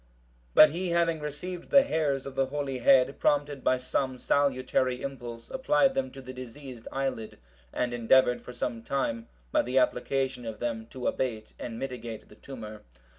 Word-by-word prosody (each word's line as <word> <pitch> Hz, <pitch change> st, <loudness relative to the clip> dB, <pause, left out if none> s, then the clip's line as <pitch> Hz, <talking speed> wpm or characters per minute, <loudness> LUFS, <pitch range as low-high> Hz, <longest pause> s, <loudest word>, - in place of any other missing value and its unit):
But 155 Hz, -1 st, +9 dB
he 180 Hz, +3 st, -2 dB
having 170 Hz, -1 st, +2 dB
received 150 Hz, +5 st, -6 dB
the 275 Hz, -1 st, +7 dB
hairs 150 Hz, -, 0 dB
of 135 Hz, -, -6 dB
the 135 Hz, 0 st, +1 dB
holy 135 Hz, -2 st, -3 dB
head, 130 Hz, +2 st, +4 dB
prompted 145 Hz, -2 st, +1 dB
by 130 Hz, -, +3 dB
some 130 Hz, +1 st, -1 dB
salutary 130 Hz, -2 st, +1 dB
impulse, 120 Hz, -4 st, -7 dB
applied 270 Hz, +1 st, +3 dB
them 265 Hz, 0 st, -1 dB
to 135 Hz, -, -11 dB
the 130 Hz, 0 st, -8 dB
diseased 130 Hz, -1 st, -9 dB
eyelid, 135 Hz, -5 st, -3 dB, 0.3 s
and 125 Hz, -1 st, -1 dB
endeavoured 125 Hz, +1 st, +4 dB
for -, -, -9 dB
some 120 Hz, -1 st, -3 dB
time, 115 Hz, -2 st, -2 dB, 0.2 s
by -, -, +4 dB
the 125 Hz, +2 st, -2 dB
application 130 Hz, 0 st, +1 dB
of 110 Hz, -, -5 dB
them, 115 Hz, -2 st, -3 dB
to 125 Hz, +1 st, -8 dB
abate 110 Hz, -5 st, -2 dB
and 115 Hz, -2 st, -5 dB
mitigate 120 Hz, -4 st, -6 dB
the -, -, -15 dB
tumour. 110 Hz, -6 st, -9 dB
130 Hz, 170 wpm, -28 LUFS, 120-145 Hz, 0.3 s, But